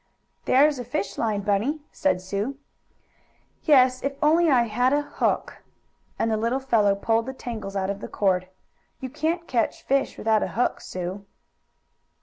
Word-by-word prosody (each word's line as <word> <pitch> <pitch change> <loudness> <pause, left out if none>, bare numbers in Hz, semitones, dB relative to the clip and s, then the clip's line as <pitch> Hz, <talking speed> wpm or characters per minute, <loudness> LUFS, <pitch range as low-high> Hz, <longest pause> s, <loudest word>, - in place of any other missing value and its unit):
"There's 285 +1 +4
a - - -3
fish 200 -5 -4
line, 215 -3 0
Bunny," 210 +10 0
said 285 - 0
Sue. 205 +8 -3 1.1
"Yes, 255 -4 +5
if 275 +1 -2
I 280 - -2
only 335 +2 +4
had 245 -1 +3
a 290 0 +2
hook," - - -2 0.6
and 225 - 0
the 220 - +1
little 230 +4 0
fellow 215 -7 +2
pulled 225 +3 0
the 265 - -5
tangles 220 -6 -6
out 195 0 0
of 200 - -6
the - - -5
cord, 185 -2 0 0.5
"You 260 -1 -6
can't 335 +4 -2
catch 235 -3 -1
fish 275 0 0
without 220 -1 +2
a - - 0
hook, 245 - 0
Sue." 185 +2 -6
235 Hz, 160 wpm, -25 LUFS, 200-270 Hz, 1.1 s, Yes